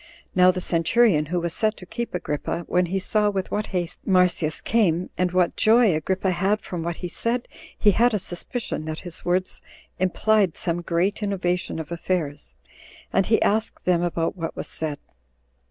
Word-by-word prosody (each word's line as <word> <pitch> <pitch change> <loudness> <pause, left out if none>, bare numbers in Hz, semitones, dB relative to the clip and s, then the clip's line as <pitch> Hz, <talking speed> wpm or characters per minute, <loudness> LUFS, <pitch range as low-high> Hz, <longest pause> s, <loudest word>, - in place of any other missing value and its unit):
Now 180 0 +6
the 185 0 0
centurion 170 -1 +3
who 175 +3 -1
was 170 -1 -2
set 215 +1 +1
to 180 - -10
keep 235 +3 -5
Agrippa, 165 -1 -3
when 180 0 +2
he 190 +3 -1
saw 210 +2 +3
with 195 -2 -3
what 210 +1 -1
haste 180 -2 -3
Marsyas 180 -4 +2
came, 185 -6 +1
and 180 -1 0
what 180 -1 +2
joy 225 -3 +5
Agrippa 185 +5 0
had 195 +4 +1
from 175 -5 -5
what 170 +1 -3
he - - -1
said, 235 +7 -2 0.3
he 210 - +5
had 235 +5 +3
a - - +3
suspicion 190 - -4
that 155 0 -5
his 175 -2 -7
words 180 +1 -1 0.4
implied 190 0 +2
some 175 -1 -2
great 175 +5 0
innovation 185 -4 -1
of 160 0 -6
affairs, 165 -4 -3 0.6
and 195 - +2
he 220 - +4
asked 220 +2 0
them 180 -2 +3
about 170 -1 -1
what 165 -3 -5
was - - -5
said. 155 -2 -4
180 Hz, 180 wpm, -24 LUFS, 170-205 Hz, 0.6 s, Now